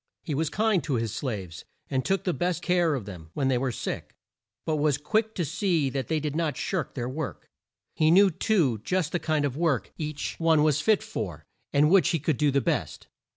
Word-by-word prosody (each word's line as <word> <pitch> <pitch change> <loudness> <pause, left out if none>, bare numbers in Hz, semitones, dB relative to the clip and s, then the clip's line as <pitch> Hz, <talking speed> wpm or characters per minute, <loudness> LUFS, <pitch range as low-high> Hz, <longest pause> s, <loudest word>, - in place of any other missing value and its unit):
He 155 - -3
was 155 +2 0
kind 215 -3 +1
to 140 - 0
his 115 -2 -1
slaves, 100 - -5 0.2
and 130 -1 -1
took 195 0 0
the 180 - 0
best 175 -1 -1
of - - -8
care 175 -4 +3
of 120 -7 -5
them 90 -6 -9
when 135 -2 +1
they 125 -2 +2
were 130 0 -1
sick, - - -5 0.5
but 155 -1 0
was 145 -2 +2
quick 220 +9 0
to 175 - -1
see 165 - 0
that 135 -1 -3
they 160 -1 0
did 150 -1 -3
not 160 -5 -1
shirk 155 -6 -2
their 120 -3 -2
work. 140 +3 -5 0.4
He 155 0 +3
knew, 190 +3 +6
too, 155 - +1
just 180 -4 0
the 175 - 0
kind 155 -2 0
of 135 -3 -2
work 155 -6 0
each 150 -2 -4
one 160 -2 +4
was 155 -1 +3
fit 220 -1 +3
for, 110 - -5 0.3
and 150 +3 +4
which 195 -1 +5
he 165 - +1
could 155 +2 0
do 150 -1 +3
the 140 0 +2
best. - - -2
155 Hz, 225 wpm, -27 LUFS, 135-175 Hz, 0.5 s, knew